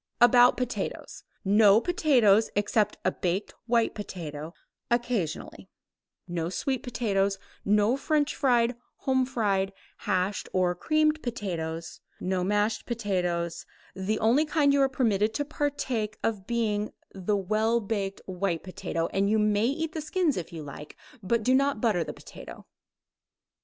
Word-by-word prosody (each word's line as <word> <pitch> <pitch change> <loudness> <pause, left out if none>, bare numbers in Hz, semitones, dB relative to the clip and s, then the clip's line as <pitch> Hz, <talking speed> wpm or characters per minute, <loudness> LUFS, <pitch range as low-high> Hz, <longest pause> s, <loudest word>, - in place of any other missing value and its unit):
About 245 +1 +6
potatoes: 250 -1 -4 0.2
no 205 +1 +6
potatoes 240 - +3
except 205 +1 +1
a - - +3
baked 190 +2 -2
white 235 -1 +2
potato, 165 -5 -7 0.3
occasionally 240 -9 -2 0.6
no 170 -1 -2
sweet 260 +7 -2
potatoes, 200 -6 0 0.3
no 210 +4 +3
French 300 +1 +1
fried, 245 -3 +2 0.2
home 260 -1 +1
fried, 200 -6 0 0.3
hashed 185 +2 -1
or 180 -1 +2
creamed 310 - +1
potatoes 170 -9 -4 0.2
no 185 0 -1
mashed 205 +3 0
potatoes; 180 -7 -2 0.3
the 195 +3 -1
only 230 +8 +3
kind 300 -2 +2
you 280 - +3
are 270 - +4
permitted 220 -5 +1
to 290 - -1
partake 270 -8 -2
of 205 -4 -2
being 215 -3 0 0.2
the 195 +2 -1
well 215 +4 +1
baked 200 -3 -3
white 180 -3 -2
potato, 165 -2 -3
and 195 +1 +2
you 220 - +3
may 210 +1 +2
eat 315 +4 -2
the 315 - -3
skins 320 -1 0
if 175 -3 -5
you 165 -2 -7
like, 145 +1 -10 0.2
but 220 +3 0
do 255 - +3
not 275 -2 +2
butter 210 -7 +2
the - - -6
potato. - - -11
215 Hz, 140 wpm, -27 LUFS, 190-250 Hz, 0.6 s, About